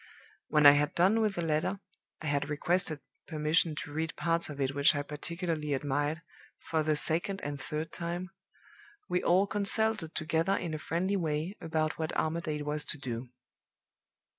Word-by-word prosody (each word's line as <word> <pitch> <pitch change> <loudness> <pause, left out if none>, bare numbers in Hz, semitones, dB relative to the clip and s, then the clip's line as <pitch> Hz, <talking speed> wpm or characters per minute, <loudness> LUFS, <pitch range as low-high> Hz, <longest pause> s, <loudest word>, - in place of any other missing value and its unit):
"When 150 -1 +3
I 145 - +13
had 145 +1 +1
done 195 +6 +4
with 210 -3 +1
the 175 - -2
letter 160 +5 0 0.4
I - - -5
had 145 -1 0
requested 155 0 0 0.3
permission 155 0 +1
to 145 -1 -6
read 160 +2 -2
parts 165 -1 0
of 145 -1 -7
it 135 0 0
which 140 +1 +4
I 145 - -1
particularly 155 0 -3
admired, 145 +3 -1 0.3
for 160 -1 -1
the 155 0 +1
second 165 +7 0
and 145 -1 -4
third 155 +3 -4
time! 175 +2 -4 0.8
we 180 - 0
all 185 +3 +4
consulted 205 -3 +1
together 165 +5 +1
in 165 -3 -3
a 155 - -3
friendly 185 +6 0
way 160 +2 -2
about 160 -1 -1
what 160 -1 -2
Armadale 155 -2 -1
was 150 0 0
to - - -2
do. 125 -2 -5
155 Hz, 165 wpm, -31 LUFS, 150-175 Hz, 0.8 s, I